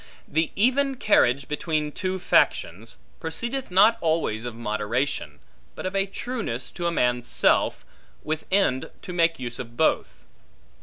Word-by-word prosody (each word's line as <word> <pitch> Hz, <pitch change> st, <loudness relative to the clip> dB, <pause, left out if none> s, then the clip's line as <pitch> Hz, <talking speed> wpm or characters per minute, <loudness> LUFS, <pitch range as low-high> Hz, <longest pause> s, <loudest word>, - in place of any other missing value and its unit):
The 160 Hz, +1 st, 0 dB
even 265 Hz, +5 st, +2 dB
carriage 140 Hz, -, +3 dB
between 150 Hz, 0 st, -1 dB
two 185 Hz, +4 st, -2 dB
factions, 115 Hz, -, +1 dB, 0.2 s
proceedeth 235 Hz, -, -3 dB
not 210 Hz, +5 st, +5 dB
always 155 Hz, -9 st, 0 dB
of 120 Hz, -2 st, -5 dB
moderation, 115 Hz, +4 st, -2 dB, 0.4 s
but -, -, -6 dB
of 185 Hz, +1 st, -3 dB
a 195 Hz, 0 st, +2 dB
trueness 195 Hz, -, -4 dB
to 175 Hz, -, -3 dB
a -, -, +1 dB
man's 125 Hz, -5 st, +1 dB
self, -, -, +2 dB, 0.4 s
with 155 Hz, 0 st, -3 dB
end 185 Hz, -10 st, +2 dB
to 180 Hz, -, -6 dB
make 165 Hz, -1 st, +2 dB
use 120 Hz, -2 st, -5 dB
of 120 Hz, -1 st, -8 dB
both. -, -, 0 dB
160 Hz, 145 wpm, -25 LUFS, 125-195 Hz, 0.4 s, not